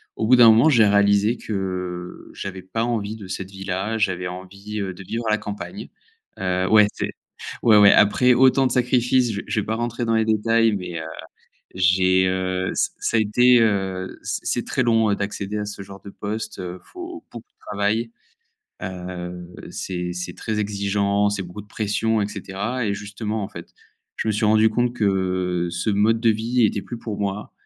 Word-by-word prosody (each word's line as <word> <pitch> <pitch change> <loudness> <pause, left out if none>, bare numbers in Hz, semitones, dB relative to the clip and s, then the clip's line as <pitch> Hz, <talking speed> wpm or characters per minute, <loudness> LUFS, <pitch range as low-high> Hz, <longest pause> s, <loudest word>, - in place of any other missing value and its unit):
au 110 - -1
bout 125 - +7
d'un 120 -2 +8
moment, 115 +8 +6
j'ai 115 -6 +5
réalisé 100 +3 +3
que 90 -3 -5
j'avais 95 -1 -6
pas 95 +5 -3
envie 110 -3 -2
de 100 -4 -10
cette 95 +1 -6
vie-là. 95 +3 -3
J'avais 95 -4 0
envie, 100 +4 -7
heu, 95 -2 -3
de 95 - -11
vivre 115 +5 -4
à - - +2
la 105 - +3
campagne. 105 - -7 0.5
Heu, 95 0 0
ouais, 105 -1 +6
c - - -3 0.5
ouais, 110 -3 +6
ouais. 100 -1 +8
Après 125 +5 +5
autant 130 +1 +4
de - - -4
sacrifices, 125 -1 +2
je 100 - -3
v - - -15
je 105 - 0
vais - - -2
pas 110 - -1
rentrer 120 +1 -2
dans 115 0 +1
les 110 - +2
détails, 115 +1 +2
mais 90 -3 -5
heu, - - -7 0.7
j'ai, 95 0 +3
heu, 95 0 -1
ça - - +1
ça 115 - 0
a - - +4
été, 125 +3 +4
heu, 95 -4 -1
c - - -2
c'est - - -1
très 130 - 0
long, 115 -2 +3
heu, 100 - +2
d'accéder 100 0 -4
à 105 - -2
ce 100 -1 -7
genre 95 0 -11
de 100 - -10
poste. 110 +1 -5
Heu, 90 0 -6
faut 350 -2 -9
beaucoup 120 -1 -10
de - - -57
travail, 105 +3 0 0.7
heu, 90 -1 -6 0.2
c'est 90 -1 -4
c'est 90 0 -5
très 110 -1 -3
exigeant, 100 0 0
c'est 100 -1 -2
beaucoup 90 +3 -9
de - - -20
pression 110 +1 0
et 100 - 0
cetera, 105 +5 -4
et 100 - 0
justement, 105 +1 -4
en - - -6
fait. 85 -3 -10 0.5
Je - - -2
me 110 - +2
suis 105 +1 0
rendu 110 +1 +4
compte 120 +2 0
que 95 -3 0
ce 90 +5 -1
mode 110 +3 +2
de 115 -2 +4
vie 115 +3 +1
était 100 -1 0
plus 120 - -7
pour 110 -4 -6
moi. 100 0 -3
105 Hz, 200 wpm, -22 LUFS, 95-110 Hz, 0.7 s, d'un